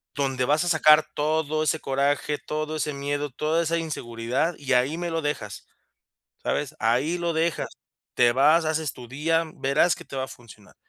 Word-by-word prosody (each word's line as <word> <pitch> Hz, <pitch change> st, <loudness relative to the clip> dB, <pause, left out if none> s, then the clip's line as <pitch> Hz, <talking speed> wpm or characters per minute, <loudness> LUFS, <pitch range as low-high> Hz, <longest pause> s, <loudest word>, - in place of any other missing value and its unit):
donde 135 Hz, -3 st, 0 dB
vas 150 Hz, +5 st, +2 dB
a 175 Hz, -, -1 dB
sacar 155 Hz, -1 st, +6 dB
todo 155 Hz, +1 st, 0 dB
ese 155 Hz, 0 st, 0 dB
coraje, 140 Hz, +2 st, 0 dB
todo 155 Hz, +1 st, -4 dB
ese 150 Hz, -1 st, -2 dB
miedo, 145 Hz, 0 st, -3 dB
toda 155 Hz, +5 st, 0 dB
esa 165 Hz, +1 st, 0 dB
inseguridad 130 Hz, -1 st, -2 dB
y 135 Hz, -2 st, -5 dB
ahí 130 Hz, +6 st, +2 dB
me 175 Hz, 0 st, -3 dB
lo 165 Hz, 0 st, -1 dB
dejas, 115 Hz, -9 st, -4 dB, 0.8 s
¿sabes?, 145 Hz, +1 st, -2 dB
ahí 130 Hz, +10 st, +1 dB
lo 170 Hz, -1 st, -1 dB
dejas. 165 Hz, +1 st, 0 dB, 0.5 s
Te 120 Hz, -1 st, +4 dB
vas 155 Hz, +5 st, +4 dB
haces 155 Hz, -1 st, -1 dB
tu 125 Hz, -2 st, -11 dB
día. 165 Hz, +5 st, 0 dB
Verás 140 Hz, +5 st, +2 dB
que -, -, -11 dB
te 135 Hz, -, -8 dB
va 130 Hz, -, -1 dB
a -, -, -16 dB
funcionar, 110 Hz, -5 st, -15 dB
150 Hz, 180 wpm, -25 LUFS, 135-160 Hz, 0.8 s, sacar